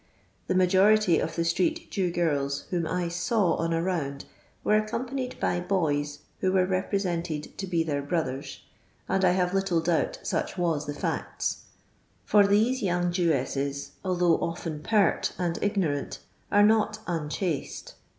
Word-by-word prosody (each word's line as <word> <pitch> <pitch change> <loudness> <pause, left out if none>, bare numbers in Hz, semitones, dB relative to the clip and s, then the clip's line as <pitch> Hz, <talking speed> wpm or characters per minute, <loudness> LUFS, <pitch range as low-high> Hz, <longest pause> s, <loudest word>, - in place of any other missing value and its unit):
The - - 0
majority 190 +1 +4
of 160 - -3
the 170 - 0
street 325 - 0
Jew 190 -3 0
girls 145 -5 0
whom 170 -3 0
I 180 +1 -1
saw 180 +2 +1
on 165 0 -1
a 165 0 0
round 145 -7 -2 0.4
were 210 - +3
accompanied 250 +4 -2
by 175 - 0
boys 150 -6 -1 0.2
who 185 - +1
were 185 -1 +3
re 185 0 0
presented 170 -6 -3
to 195 - -3
be 170 -2 +1
their 145 -3 -1
brothers, 140 -3 -3 0.5
and 190 0 +1
I 180 -1 +5
have 180 0 +1
little 195 -3 +1
doubt 175 - 0
such - - -2
was 165 -4 0
the 145 - -4
facts, - - -3 0.6
for 205 -1 +5
these 225 +6 +2
yonng 175 -2 +1
Jewesses, 140 -5 -1
although 180 -3 +2
oft'.n 165 -2 -4
pert 205 -4 +2
and 175 -2 -1
ignorant, 185 -9 -1 0.3
are 205 0 +5
not 215 0 +3
unchaste. 165 -1 -3
175 Hz, 150 wpm, -27 LUFS, 160-195 Hz, 0.6 s, I